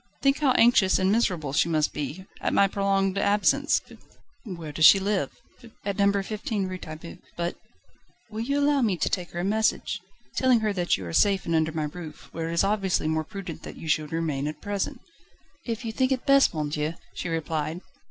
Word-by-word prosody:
Think 275 Hz, +1 st, +3 dB
how 290 Hz, -3 st, +3 dB
anxious 230 Hz, -6 st, +5 dB
and 190 Hz, +1 st, +2 dB
miserable 175 Hz, -, 0 dB
she 165 Hz, +3 st, +2 dB
must 155 Hz, -2 st, +1 dB
be, 150 Hz, +6 st, -5 dB, 0.2 s
at -, -, 0 dB
my 200 Hz, -, +5 dB
prolonged 195 Hz, 0 st, 0 dB
absence." 205 Hz, +1 st, +2 dB, 0.6 s
"Where 170 Hz, -, -7 dB
does 155 Hz, +1 st, +6 dB
she 195 Hz, -, +8 dB
live?" 195 Hz, -7 st, 0 dB, 0.6 s
"At 200 Hz, 0 st, -2 dB
No. 200 Hz, 0 st, +3 dB
15 210 Hz, -1 st, -3 dB
Rue 185 Hz, 0 st, -5 dB
Taitbout, 155 Hz, +1 st, -9 dB, 0.2 s
but 170 Hz, 0 st, -2 dB, 0.4 s
..." -, -, -37 dB
"Will 215 Hz, -, -5 dB
you 280 Hz, +5 st, 0 dB
allow 285 Hz, -1 st, +3 dB
me 210 Hz, -7 st, +1 dB
to -, -, 0 dB
take 180 Hz, -2 st, -2 dB
her 175 Hz, -, -4 dB
a -, -, -3 dB
message? 215 Hz, +3 st, 0 dB, 0.3 s
telling 255 Hz, -3 st, +3 dB
her 215 Hz, -1 st, 0 dB
that 175 Hz, -2 st, +1 dB
you 95 Hz, -, -7 dB
are 85 Hz, -, -6 dB
safe 195 Hz, -, +3 dB
and 170 Hz, -, -1 dB
under 160 Hz, 0 st, +2 dB
my 155 Hz, -1 st, -2 dB
roof, 155 Hz, 0 st, -8 dB
where 165 Hz, 0 st, -4 dB
it -, -, -3 dB
is 170 Hz, -, +3 dB
obviously 195 Hz, -5 st, +1 dB
more 160 Hz, 0 st, 0 dB
prudent 180 Hz, -1 st, -8 dB
that -, -, -9 dB
you 160 Hz, -, -8 dB
should 155 Hz, -1 st, 0 dB
remain 155 Hz, -4 st, -1 dB
at 150 Hz, 0 st, -5 dB
present." 200 Hz, +1 st, -3 dB, 0.7 s
"If 230 Hz, 0 st, -3 dB
you 225 Hz, -, -2 dB
think 260 Hz, +3 st, +1 dB
it 260 Hz, -1 st, -1 dB
best, 275 Hz, 0 st, +5 dB
monsieur," 150 Hz, +1 st, -2 dB, 0.2 s
she 180 Hz, -, -4 dB
replied. 160 Hz, 0 st, -2 dB
185 Hz, 205 wpm, -26 LUFS, 160-210 Hz, 0.7 s, she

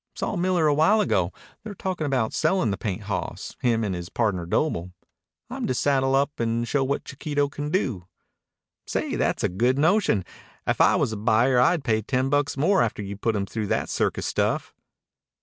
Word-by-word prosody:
"Saw -, -, -2 dB
Miller 180 Hz, -2 st, +1 dB
a 150 Hz, -, +4 dB
while 160 Hz, +9 st, +4 dB
ago. 95 Hz, -, +1 dB, 0.3 s
They're 215 Hz, -1 st, -8 dB
talkin' 180 Hz, -5 st, -3 dB
about 130 Hz, -5 st, 0 dB
sellin' 185 Hz, -, +1 dB
the -, -, 0 dB
paint 105 Hz, 0 st, -3 dB
hawss, 100 Hz, -2 st, -4 dB
him 115 Hz, -2 st, +2 dB
and 100 Hz, -3 st, -1 dB
his 85 Hz, 0 st, -6 dB
pardner 100 Hz, -8 st, -1 dB
Doble. 90 Hz, -, -1 dB, 0.6 s
I'm -, -, -4 dB
to 130 Hz, -, 0 dB
saddle 135 Hz, 0 st, +2 dB
up 140 Hz, +2 st, 0 dB
and 115 Hz, 0 st, 0 dB
show 140 Hz, +1 st, +1 dB
what 140 Hz, +1 st, -2 dB
Chiquito 145 Hz, +1 st, -1 dB
can 145 Hz, +1 st, -5 dB
do." 125 Hz, -, -1 dB, 0.8 s
"Say, -, -, -2 dB
that's -, -, 0 dB
a -, -, +4 dB
good 120 Hz, +9 st, +1 dB
notion. 160 Hz, -, +2 dB, 0.4 s
If -, -, +1 dB
I -, -, +5 dB
was 110 Hz, -, 0 dB
a -, -, -4 dB
buyer 115 Hz, +4 st, +3 dB
I'd 150 Hz, +5 st, +3 dB
pay 110 Hz, -4 st, +1 dB
ten 130 Hz, +4 st, 0 dB
bucks 145 Hz, -1 st, +1 dB
more 185 Hz, +8 st, +3 dB
after 110 Hz, -2 st, -1 dB
you'd 100 Hz, +1 st, -7 dB
put 115 Hz, -2 st, +1 dB
him 100 Hz, -1 st, -1 dB
through 105 Hz, +2 st, -4 dB
that -, -, -1 dB
circus -, -, -1 dB
stuff." -, -, -1 dB
130 Hz, 195 wpm, -25 LUFS, 105-145 Hz, 0.8 s, I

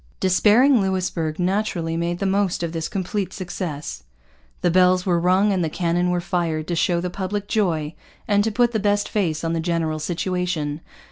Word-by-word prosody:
Despairing 220 Hz, +7 st, +4 dB
Louisbourg 180 Hz, -4 st, -1 dB
naturally 180 Hz, -3 st, -1 dB
made 170 Hz, +1 st, -1 dB
the 195 Hz, -, -3 dB
most 195 Hz, -2 st, +1 dB
of 170 Hz, -, -2 dB
this 165 Hz, -1 st, -3 dB
complete 195 Hz, -1 st, -3 dB
success. 170 Hz, -, -5 dB, 0.6 s
The 175 Hz, -, +2 dB
bells 185 Hz, 0 st, +4 dB
were 175 Hz, -3 st, +2 dB
rung 185 Hz, +4 st, +3 dB
and 185 Hz, -2 st, 0 dB
the 160 Hz, -, 0 dB
cannon 175 Hz, +2 st, 0 dB
were 180 Hz, 0 st, +1 dB
fired 170 Hz, -3 st, -2 dB
to 175 Hz, -, 0 dB
show 170 Hz, +1 st, +1 dB
the 180 Hz, +1 st, -3 dB
public 200 Hz, +2 st, -3 dB
joy 165 Hz, -9 st, 0 dB, 0.3 s
and 205 Hz, -2 st, +3 dB
to 225 Hz, -, 0 dB
put 240 Hz, +2 st, +2 dB
the 220 Hz, -, 0 dB
best 205 Hz, 0 st, +1 dB
face 170 Hz, -7 st, -1 dB
on 165 Hz, 0 st, -1 dB
the 165 Hz, -, -1 dB
general 165 Hz, -2 st, -1 dB
situation. 175 Hz, -2 st, -2 dB
180 Hz, 185 wpm, -22 LUFS, 165-195 Hz, 0.6 s, Despairing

